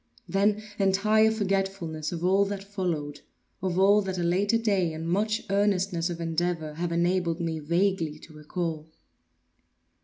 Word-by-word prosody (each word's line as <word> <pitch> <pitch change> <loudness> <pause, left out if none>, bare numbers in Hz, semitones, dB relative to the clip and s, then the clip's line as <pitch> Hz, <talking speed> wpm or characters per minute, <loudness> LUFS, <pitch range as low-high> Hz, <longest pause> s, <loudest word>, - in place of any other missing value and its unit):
Then 205 +2 +1 0.2
entire 215 +3 +4
forgetfulness 195 -7 -2
of 170 0 -3
all 195 +2 +4
that 200 -1 -4
followed; 175 -8 -3 0.4
of 185 -1 -1
all 200 +2 +5
that 190 -2 -4
a 175 - -1
later 195 +6 +2
day 195 -7 +1
and 160 +1 -5
much 210 +5 0
earnestness 195 -4 +1
of 170 -1 -5
endeavor 165 -1 -1
have 170 +2 -3
enabled 175 0 +1
me 165 -2 -2
vaguely 170 0 0
to 155 - -15
recall. 155 +1 -4
180 Hz, 145 wpm, -27 LUFS, 165-200 Hz, 0.4 s, all